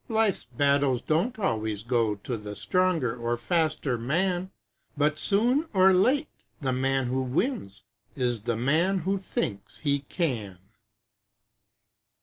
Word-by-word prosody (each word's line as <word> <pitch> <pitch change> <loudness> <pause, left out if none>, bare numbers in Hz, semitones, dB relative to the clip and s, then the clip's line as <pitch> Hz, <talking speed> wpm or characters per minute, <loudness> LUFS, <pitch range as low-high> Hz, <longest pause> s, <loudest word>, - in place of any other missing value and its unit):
Life's 220 - +1
battles 140 +1 +1
don't 180 +11 0
always 110 - -1
go 115 -3 +1
To 110 +5 -5
the 105 -1 -7
stronger 180 - +1
or 120 0 -2
faster 145 -3 0
man, 175 +8 0 0.5
But 150 +1 +1
soon 245 +10 +2
or 190 0 +6
late 260 +11 +3 0.3
the 135 -5 -1
man 135 +1 +1
who 130 +2 -1
wins 130 - -2 0.3
Is 120 -4 -1
the 115 +1 -1
man 165 +10 +2
WHO 195 +4 0
THINKS 100 - -4
HE 140 -2 0
CAN! 115 - -2
140 Hz, 130 wpm, -27 LUFS, 120-185 Hz, 0.5 s, or